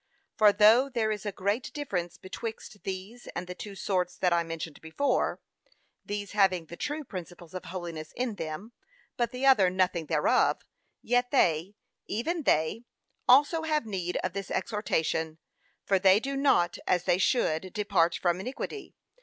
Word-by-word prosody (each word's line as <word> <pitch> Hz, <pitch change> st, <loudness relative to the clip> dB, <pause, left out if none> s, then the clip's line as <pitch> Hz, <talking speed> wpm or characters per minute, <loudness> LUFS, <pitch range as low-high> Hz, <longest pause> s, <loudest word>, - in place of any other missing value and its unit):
For 215 Hz, -1 st, +6 dB
though 225 Hz, +7 st, +6 dB
there 230 Hz, -4 st, 0 dB
is 210 Hz, -1 st, -4 dB
a -, -, -1 dB
great 200 Hz, +5 st, -2 dB
difference 185 Hz, -, -3 dB
betwixt 215 Hz, +1 st, -7 dB
these 195 Hz, +6 st, -6 dB
and 175 Hz, -, -3 dB
the 180 Hz, -, -6 dB
two 200 Hz, +2 st, -8 dB
sorts 180 Hz, -2 st, -1 dB
that 180 Hz, -2 st, +2 dB
I 170 Hz, -, +3 dB
mentioned 165 Hz, -2 st, -6 dB
before, 160 Hz, -, 0 dB, 0.6 s
these 205 Hz, -1 st, -4 dB
having 190 Hz, -5 st, +2 dB
the 170 Hz, -, -9 dB
true 295 Hz, -, -3 dB
principles 175 Hz, -, -9 dB
of 185 Hz, -, -6 dB
holiness 170 Hz, -3 st, -6 dB
in 250 Hz, -2 st, -1 dB
them, 165 Hz, +4 st, -6 dB, 0.4 s
but 240 Hz, -1 st, 0 dB
the 255 Hz, +2 st, -3 dB
other 215 Hz, -9 st, +6 dB
nothing 180 Hz, -3 st, 0 dB
thereof, 150 Hz, -1 st, +2 dB, 0.4 s
yet 245 Hz, +1 st, +2 dB
they, 180 Hz, -, +2 dB, 0.3 s
even 320 Hz, -, -1 dB
they, 160 Hz, -, +1 dB, 0.4 s
also 290 Hz, +6 st, +6 dB
have 310 Hz, -5 st, 0 dB
need 185 Hz, -4 st, -3 dB
of 185 Hz, -, -2 dB
this 195 Hz, -1 st, -5 dB
exhortation; 160 Hz, -6 st, -1 dB, 0.5 s
for 195 Hz, -1 st, +3 dB
they 190 Hz, +1 st, +6 dB
do 275 Hz, +4 st, -4 dB
not, 180 Hz, -11 st, +2 dB
as 180 Hz, -1 st, +2 dB
they 175 Hz, -, +2 dB
should, 185 Hz, -5 st, +1 dB
'depart 190 Hz, -5 st, +2 dB
from 175 Hz, 0 st, +1 dB
iniquity.' 270 Hz, -, -6 dB
195 Hz, 160 wpm, -29 LUFS, 175-235 Hz, 0.6 s, For